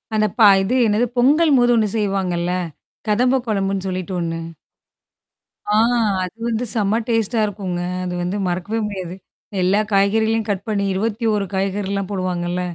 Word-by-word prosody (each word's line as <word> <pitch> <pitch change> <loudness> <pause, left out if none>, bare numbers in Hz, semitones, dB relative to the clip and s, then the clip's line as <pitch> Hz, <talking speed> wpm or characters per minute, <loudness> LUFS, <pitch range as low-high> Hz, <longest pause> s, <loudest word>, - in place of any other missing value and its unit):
அந்த 215 0 +3
பா 215 - +8 0.2
இது 240 +7 0
என்னது 215 +4 +2
பொங்கல்ம் 290 +3 +4
போது 245 0 +4
ஒண்ணு 215 -3 +2
செய்வாங்கல்ல? 185 -4 -1 0.6
கதம்ப 250 +5 +2
கொழம்புன்னு 195 -2 -1
சொல்லிட்டு 185 0 -4
ஒண்ணு. 165 0 -3 1.3
ஆ - - +1 0.5
அது 180 +1 -6
வந்து 235 +1 -1
செம்ம 215 0 +1
டேஸ்ட்டா 225 -1 0
இருக்குங்க. 190 -4 -4 0.2
அது 180 -1 -3
வந்து 180 +3 -2
மறக்கவே 185 +5 -2
முடியாது. 185 -3 -6 0.5
எல்லா 190 +3 +3
காய்கறிகளையும் 220 +3 +2
கட் 200 -1 -2
பண்ணி, 205 -2 0
21 210 +1 0
காய்கறிலாம் 195 0 -2
போடுவாங்கல்ல. 180 -2 -2
200 Hz, 135 wpm, -20 LUFS, 185-220 Hz, 1.3 s, பா